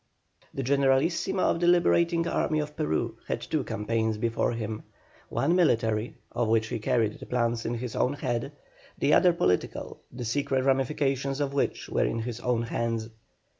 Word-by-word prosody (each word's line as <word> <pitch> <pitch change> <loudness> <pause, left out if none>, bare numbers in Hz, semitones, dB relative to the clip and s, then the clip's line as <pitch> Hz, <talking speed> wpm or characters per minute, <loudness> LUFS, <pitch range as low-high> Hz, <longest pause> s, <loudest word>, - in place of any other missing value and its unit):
The 135 - -4
Generalissimo 140 +7 +2
of - - +2
the 175 - +2
Liberating 170 -1 +3
Army 155 - 0
of 150 0 -3
Peru 150 - -1
had - - -1
two - - -2
campaigns 110 +1 -1
before 115 +2 0
him 110 -2 -4 0.5
one 165 +5 +1
military, 115 -9 +2 0.2
of 120 -2 0
which 110 0 +2
he 115 - -3
carried 115 -2 0
the - - -9
plans 120 -2 0
in 120 - -1
his 120 -1 -5
own 130 - +1
head; 130 -2 -2 0.5
the 150 - +2
other 180 0 +6
political, 90 - -1
the 125 - -6
secret 130 +2 0
ramifications 135 0 0
of 140 -1 -1
which 140 - -1
were - - +1
in - - -1
his 120 0 -5
own 120 -1 0
hands. 115 -1 -2
125 Hz, 170 wpm, -27 LUFS, 115-145 Hz, 0.5 s, other